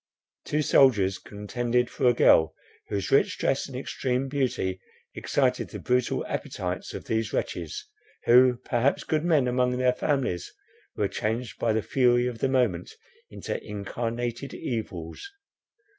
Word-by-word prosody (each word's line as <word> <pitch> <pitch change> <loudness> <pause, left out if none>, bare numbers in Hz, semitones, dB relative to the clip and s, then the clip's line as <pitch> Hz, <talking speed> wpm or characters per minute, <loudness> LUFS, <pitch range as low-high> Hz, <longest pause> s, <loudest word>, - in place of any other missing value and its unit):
Two 150 +1 0
soldiers 100 -10 +4
contended 120 +4 -1
for 125 - 0
a 120 - +6
girl, 80 -7 +5 0.3
whose 100 -1 -3
rich 135 - +3
dress 135 - 0
and 130 -2 -7
extreme 130 0 -2
beauty 125 -9 -1 0.3
excited - - 0
the - - -7
brutal 125 0 0
appetites - - -4
of - - -7
these 110 0 -1
wretches, 420 0 -3 0.4
who, 125 +1 +6
perhaps 125 +3 +1
good 155 -1 0
men 155 -7 +3
among 125 0 +1
their 125 0 +3
families, 130 - -1 0.4
were - - +1
changed 115 +2 -3
by 115 - +1
the 110 -1 0
fury 120 -2 +3
of 120 -2 -3
the 135 - +1
moment 120 -10 +1 0.4
into - - -5
incarnated 115 +5 -4
evils. 95 -9 -5
125 Hz, 140 wpm, -26 LUFS, 110-130 Hz, 0.4 s, a